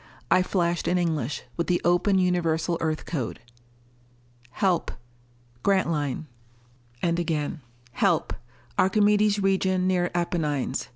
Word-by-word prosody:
I 185 - +6
flashed 175 -2 0
in 180 - +2
English, 155 -7 -1
with 170 - -1
the 175 -1 +2
open 175 +3 +3
Universal 170 -2 +1
Earth 155 -1 -1
code: 135 -9 -3 1.1
Help. 180 +7 0 0.7
Grantline. 160 -7 0 0.8
And 170 0 +1
again: 160 -2 -2 0.4
_Help. - - +2 0.5
Archimedes 210 +1 +3
region 190 -1 +1
near 180 -1 +1
Apennines. 150 - -1
175 Hz, 105 wpm, -26 LUFS, 160-185 Hz, 1.1 s, I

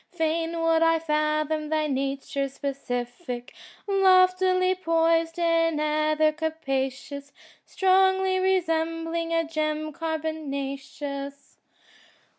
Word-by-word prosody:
Fain 330 0 -1
would 330 0 +2
I 330 0 +4
fathom 305 -1 -1
thy 310 0 +1
nature's 275 0 -2
specific 245 -2 -5 0.3
Loftily 370 -1 +4
poised 330 -2 +1
in 330 -2 +2
ether 305 0 +2
capacious. 280 -2 -3 0.4
Strongly 380 0 +3
resembling 330 -2 0
a 330 0 +2
gem 310 -1 -2
carbonaceous. 280 -3 -5
315 Hz, 80 wpm, -26 LUFS, 285-330 Hz, 0.4 s, I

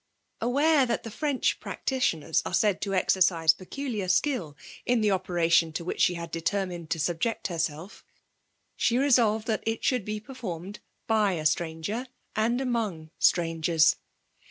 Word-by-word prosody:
Aware 280 +4 +3
that 235 - -1
the 225 - -7
French 285 +1 0
practitioners 165 - -1
are - - -2
said 205 -3 +2
to 195 -1 -1
exercise 175 -4 +3
peculiar 215 +1 -5
skill 185 - 0 0.3
in 245 -2 +1
the 210 -1 +2
operation 175 -3 +2
to 170 - -4
which - - -3
she 180 - +3
had 170 -1 -6
determined 175 -1 -2
to 165 - -1
subject 175 +8 -1
herself, 165 +2 -4 0.7
she 235 - +1
resolved 235 -5 +3
that 220 -2 -1
it 225 0 -2
should 250 -5 +1
be 210 +2 -4
performed 205 -6 -7 0.3
by 215 -3 +2
a 155 -3 -4
stranger 165 +10 -1 0.3
and 230 +3 +1
among 215 -12 -2
strangers. 165 -1 +3
195 Hz, 145 wpm, -27 LUFS, 165-235 Hz, 0.7 s, Aware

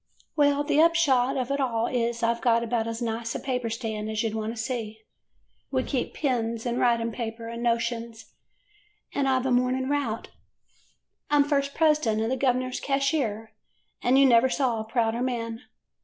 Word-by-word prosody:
"Well, 285 -1 +3
the 295 +1 +3
upshot 290 -7 +3
of 255 0 -2
it 280 - 0
all 235 -4 0
is 235 -1 -1
I 230 0 +3
've 235 - -11
got 235 -2 +3
about 230 -1 -1
as 230 +1 -4
nice 230 0 -3
a - - -2
paper 250 -3 -2
stand 220 -2 -4
as 220 0 -1
you 225 - -1
'd - - -6
want 220 0 -2
to 230 - -7
see. 225 -3 -4 0.7
We 260 -1 0
keep 260 -2 -3
pens, 230 -5 -1
and 240 0 -1
writing 235 -1 +2
paper, 230 0 -5
and 235 0 -6
notions, 235 -1 -2 0.8
and 275 -1 +1
I 260 - +3
've 255 - -5
a 265 - +1
morning 255 +2 +1
route. 275 -6 -2 1.0
I 295 - +2
'm 290 - +6
first 280 -1 -1
president 300 -9 +2
and 225 - -1
the - - +2
gov'ner 255 -1 0
's - - -2
cashier, 275 -6 -1 0.5
an' 250 +2 +3
you 275 - +6
never 250 0 +5
saw 250 -4 0
a 220 - -4
prouder 225 +1 0
man. 235 -2 -3
240 Hz, 195 wpm, -26 LUFS, 230-265 Hz, 1.0 s, m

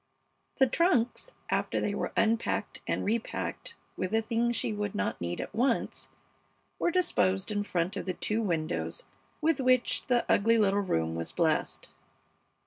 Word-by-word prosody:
The 265 - +5
trunks, 335 - +1 0.2
after - - 0
they - - -1
were - - -2
unpacked 225 +1 0
and - - -1
repacked 225 +2 -2 0.2
with 185 - -2
the 220 +2 +2
things 235 +1 0
she 220 - -1
would 205 -1 -3
not 95 - -2
need 85 0 -3
at - - -5
once, 245 +1 0 0.7
were - - +2
disposed 215 - +1
in 205 -1 0
front 185 -1 -1
of 200 - -4
the 185 -2 -2
two 215 +2 -1
windows 170 - -2 0.4
with 315 -2 +2
which 255 -1 +2
the 245 -2 +2
ugly 230 +3 +4
little 200 -2 +3
room 80 - 0
was 85 0 -3
blessed. - - 0
220 Hz, 155 wpm, -29 LUFS, 190-245 Hz, 0.7 s, The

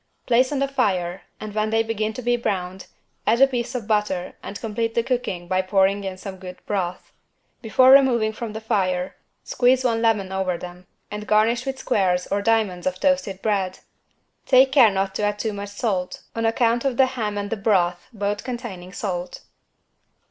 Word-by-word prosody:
Place 255 +2 +3
on 290 - -1
the 275 +1 +1
fire 190 -9 -1 0.2
and 215 -1 -7
when 215 0 0
they 225 +1 +2
begin 220 -1 -2
to 250 - -7
be 240 +1 +2
browned, 190 -5 -3 0.4
add 230 +2 +3
a 270 - +8
piece 250 -1 -3
of 240 -4 -3
butter 210 -4 -1
and 200 - -7
complete 225 0 -3
the 235 - +2
cooking 215 -9 -2
by 185 +1 +1
pouring 195 +1 +2
in 190 -1 -5
some 190 0 -8
good 185 -1 -9
broth. 180 -3 -3 0.5
Before 255 +4 +5
removing 245 -5 +5
from 220 -1 -6
the 220 - -6
fire 185 -4 -1 0.3
squeeze 255 +1 +2
one 230 -3 +1
lemon 210 -5 +1
over 190 -2 -1
them 180 +1 -10 0.2
and 210 0 -6
garnish 230 +4 +2
with 265 0 -2
squares 185 -8 +1
or 200 +1 +1
diamonds 205 -5 +1
of 185 0 -2
toasted 270 -9 0
bread. 195 -4 0 0.7
Take 260 0 +6
care 255 -5 +7
not 195 -1 -1
to 195 - -3
add 205 0 0
too 215 0 -2
much 200 0 -6
salt 200 -3 -3
on 230 0 0
account 230 +1 +1
of 265 -3 -1
the 265 - +6
ham 225 -6 -3
and 205 0 -4
the - - +1
broth 180 -4 +1
both 205 -2 -3
containing 225 -8 -7
salt. 180 -4 -4
210 Hz, 190 wpm, -23 LUFS, 190-235 Hz, 0.7 s, a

